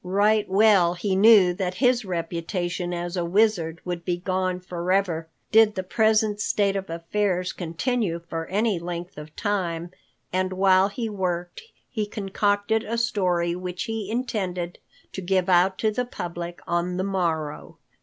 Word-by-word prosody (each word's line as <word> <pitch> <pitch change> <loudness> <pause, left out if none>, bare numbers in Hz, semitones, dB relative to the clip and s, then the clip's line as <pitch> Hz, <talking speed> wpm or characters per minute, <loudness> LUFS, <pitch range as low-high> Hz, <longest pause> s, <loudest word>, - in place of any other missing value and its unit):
Right 205 +3 +2
well 195 -3 +4
he 190 +2 -1
knew 195 -3 +7
that 180 0 -3
his 245 +1 +2
reputation 175 0 -3
as 175 0 -3
a 175 - 0
wizard 170 -3 +1
would 175 -1 -4
be 175 -1 -1
gone 185 0 -1
forever 180 -2 -1 0.2
did 220 -1 +5
the 185 - -2
present 215 +1 +2
state 200 -1 +1
of 195 -2 -3
affairs 180 +2 -1
continue 175 +2 -2
for 165 -1 -4
any 205 0 +1
length 175 -1 -6
of 150 0 -11
time, 175 -5 -2 0.4
and 185 0 0
while 190 0 +4
he 225 +3 -4
worked, 180 -4 -3 0.3
he 215 -4 -3
concocted 205 +2 0
a 230 +1 -3
story 180 -7 +1
which 180 0 -4
he 225 -3 -4
intended 190 -7 -3 0.3
to 190 - -5
give 185 0 +1
out 185 +1 +4
to 220 - +1
the 250 +3 -1
public 175 -6 -6
on 175 +1 -1
the 185 - 0
morrow. 170 -6 -2
185 Hz, 155 wpm, -25 LUFS, 175-205 Hz, 0.4 s, knew